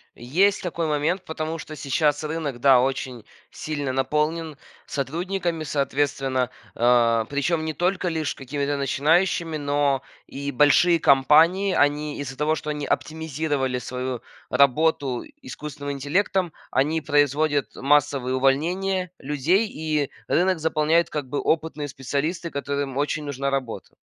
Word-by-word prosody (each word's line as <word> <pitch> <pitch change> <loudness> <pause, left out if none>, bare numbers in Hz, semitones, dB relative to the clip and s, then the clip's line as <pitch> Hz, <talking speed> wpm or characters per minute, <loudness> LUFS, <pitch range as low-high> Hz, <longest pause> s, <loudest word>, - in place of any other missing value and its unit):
Есть 180 +12 +1
такой 170 -2 -2
момент, 155 +5 0
потому 160 +1 -4
что 155 - -8
сейчас 145 +1 0
рынок, 150 -5 -3
да, 130 -1 +6
очень 130 -3 -2 0.3
сильно 145 -4 -4
наполнен 150 +3 -1 0.3
сотрудниками, 170 +4 -2
соответственно, 135 -3 0 0.3
э, 115 -1 +3
причем 155 +3 0
не 155 - -2
только 180 +3 0
лишь 160 -4 -1
какими-то 140 +2 -3
начинающими, 160 +4 +1
но 145 -2 +1 0.2
и 140 +1 -5
большие 160 +5 +4
компании- 165 +9 +4
они 145 +1 +1
из-за 135 -2 -5
того, 150 +3 +1
что 150 0 -4
они 150 -1 -4
оптимизировали 150 -4 -1
свою 125 0 -4 0.3
работу 140 -2 +2 0.2
искусственным 145 +2 -6
интеллектом, 170 +5 0 0.2
они 150 +5 +1
производят 145 -3 +1
массовые 140 -2 +2
увольнения 180 +7 +1
людей, 150 - +1
и 155 -5 -2 0.2
рынок 180 0 +2
заполняют 160 +1 +2
как 145 -4 -4
бы 145 - -2
опытные 155 -2 -1
специалисты, 140 +6 -3
которым 140 -2 -3
очень 145 +1 -1
нужна 140 -1 -2
работа. 130 -4 -4
145 Hz, 125 wpm, -24 LUFS, 135-160 Hz, 0.3 s, да